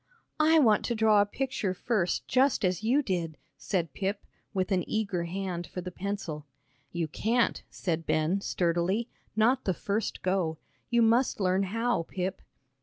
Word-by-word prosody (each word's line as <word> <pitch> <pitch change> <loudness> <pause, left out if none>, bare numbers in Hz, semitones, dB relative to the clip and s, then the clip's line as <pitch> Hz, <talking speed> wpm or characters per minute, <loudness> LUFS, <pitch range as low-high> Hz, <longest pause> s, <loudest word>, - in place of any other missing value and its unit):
"I 315 +1 +5
want 225 -9 +5
to 235 - -1
draw 215 -2 +5
a 205 - +1
picture 225 -5 -2
first, 200 -4 0
just 260 -3 +3
as 180 0 0
you 255 +7 +2
did," 170 - -2 0.2
said 170 -7 -2
Pip, 200 +1 -3 0.3
with 190 +1 -1
an 185 -2 +2
eager 200 -6 -1
hand 180 -1 -4
for - - -6
the 180 +1 -6
pencil. 180 -6 -4 0.4
"You 170 -2 -1
can't," 225 +9 +1
said 165 -3 -3
Ben, 160 +6 +1
sturdily, 180 +6 0 0.3
"not 240 +4 +3
the 185 - +1
first 205 +5 -2
go. 180 -4 0 0.3
You 235 -1 +4
must 235 +3 +3
learn 185 0 +2
how, 230 +1 0
Pip." 185 +3 -4
195 Hz, 160 wpm, -29 LUFS, 175-225 Hz, 0.4 s, I